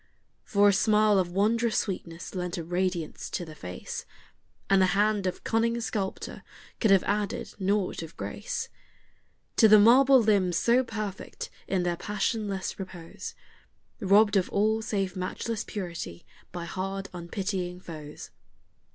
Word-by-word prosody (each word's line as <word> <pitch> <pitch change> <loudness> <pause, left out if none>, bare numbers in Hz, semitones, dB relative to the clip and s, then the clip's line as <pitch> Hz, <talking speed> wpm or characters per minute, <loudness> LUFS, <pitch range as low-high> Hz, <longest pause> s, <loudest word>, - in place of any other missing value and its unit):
For 205 0 +4
a - - +4
smile 210 0 +4
of 180 -2 0
wondrous 220 +4 +2
sweetness 170 -3 -4
lent 180 -2 -3
a 170 - -3
radiance 175 -1 -2
to 175 - -3
the 160 - -10
face, 90 -11 -6 0.6
And 195 -1 +4
the 185 - +5
hand 205 -2 +2
of 180 - -4
cunning 230 +1 +1
sculptor 210 -4 -4 0.4
could 220 - +3
have 195 -2 +6
added 205 0 -2
naught 195 -1 0
of 165 -1 -9
grace - - -4 0.9
To 225 - +8
the 215 0 +8
marble 260 +5 +7
limbs 200 -6 +3
so 245 +2 +4
perfect 215 -5 -6 0.2
in 190 -2 0
their 175 -1 0
passionless 205 0 -2
repose, 180 -3 -8 0.6
Robbed 205 0 +5
of 185 - +1
all 215 +2 +2
save 200 -4 -2
matchless 205 +4 -3
purity 170 - -6 0.3
by 175 -1 -5
hard, 195 +2 -4
unpitying 180 +1 -3
foes. 155 -4 -9
195 Hz, 140 wpm, -28 LUFS, 180-215 Hz, 0.9 s, To